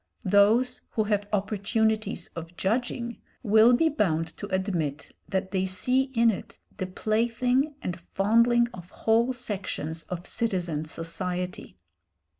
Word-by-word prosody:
Those 215 +6 +4
who 220 - +2
have 205 -1 -1
opportunities 215 0 0
of 165 +1 -8
judging, 235 +3 -1 0.2
will 220 +2 +6
be 320 +6 +3
bound 165 - 0
to 205 - -6
admit 185 -7 -2
that 190 0 -1
they 190 -1 0
see 250 +8 +1
in 230 0 +5
it 200 0 -8 0.2
the 185 - -2
plaything 240 +8 +1
and 180 0 -3
fondling 235 +7 +3
of 180 -3 -10
whole 230 +5 +2
sections 195 - -4
of 180 0 -5
citizen 175 -9 -1
society. 180 - -4
205 Hz, 125 wpm, -27 LUFS, 180-235 Hz, 0.2 s, will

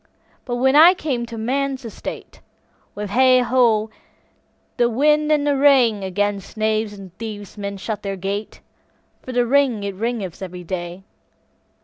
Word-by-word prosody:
But 245 - -3
when 265 +3 +2
I 335 +5 +8
came 260 -8 -3
to 230 -1 -8
man's 265 +3 -2
estate, 225 - -8 0.5
With 205 -1 -5
hey, 255 +2 +5
ho, 230 -3 +2 0.9
the 240 -1 +3
wind 300 +5 +2
and 295 -1 +2
the 290 -1 +2
rain, 245 -9 +3
'Gainst 205 +1 -2
knaves 215 0 0
and 195 -3 -12
thieves 210 -4 -7
men 200 -1 -5
shut 210 +2 -5
the 195 -1 -4
gate, 200 +3 -5 0.6
For 255 - -8
the 245 -1 +1
rain 255 -4 +2
it 200 - -2
raineth 205 -3 -4
every 180 -1 -7
day. 175 +1 -6
225 Hz, 150 wpm, -21 LUFS, 200-260 Hz, 0.9 s, I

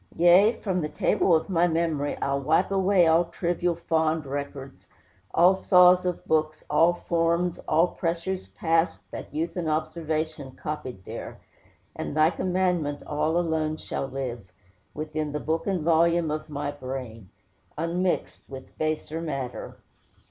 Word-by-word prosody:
Yea, 180 +6 +6
from 185 -3 0
the 150 - -3
table 170 - +2
of 160 - 0
my 175 -3 +2
memory 160 -3 -1
I'll 140 0 0
wipe 160 +7 +2
away 190 -2 +4
all 165 +2 +4
trivial, 175 0 -1
fond 160 -2 0
records, 140 -1 -6 0.4
All 180 +3 +5
saws 180 -1 +5
of 180 - -3
books, 155 -1 0
all 175 +1 +4
forms, 170 0 0
all 170 +3 +3
pressures 175 +2 -3
past 165 0 0
That - - -8
youth 160 +3 -3
and 170 -3 -2
observation 155 -2 -2
copied 130 -11 -6
there, - - -7 0.6
And 150 - -5
thy 155 +2 +5
commandment 180 -5 -1
all 155 +3 0
alone 160 -2 0
shall 135 - -4
live 125 -7 -6 0.4
Within 155 -1 -3
the 150 - -2
book 160 +5 -2
and 185 -5 0
volume 170 0 +3
of 155 0 -4
my 145 -1 -3
brain, 130 -7 -7 0.5
Unmixed 175 +3 -1
with 130 -1 -10
baser 155 +1 -2
matter." 135 -6 -5
160 Hz, 140 wpm, -26 LUFS, 150-175 Hz, 0.6 s, Yea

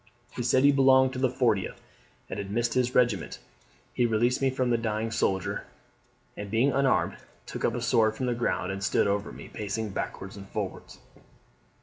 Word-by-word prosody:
He - - -5
said 130 +2 +3
he 145 - +7
belonged 130 -1 +5
to 130 - -4
the 130 -1 +2
40th, 115 -6 0 0.5
and 100 - -5
had 100 -1 -5
missed 120 +3 0
his 125 -1 0
regiment; 120 -8 +2 0.6
he 120 - +2
released 120 +3 +1
me 135 - +3
from 130 -1 0
the 120 - +3
dying 110 0 -2
soldier, 95 -4 -1 0.7
and 105 -1 -6
being 115 +7 +2
unarmed, 135 +1 +1 0.3
took - - -6
up 115 - +1
a 120 - -3
sword 110 -2 +3
from 130 - -3
the 125 - +1
ground, 115 -5 -1
and 95 0 -5
stood - - +2
over 100 +1 -1
me, - - -10
pacing 105 +1 -4
backwards 95 +1 -5
and 100 -1 -10
forwards. - - -5
115 Hz, 190 wpm, -28 LUFS, 105-130 Hz, 0.7 s, he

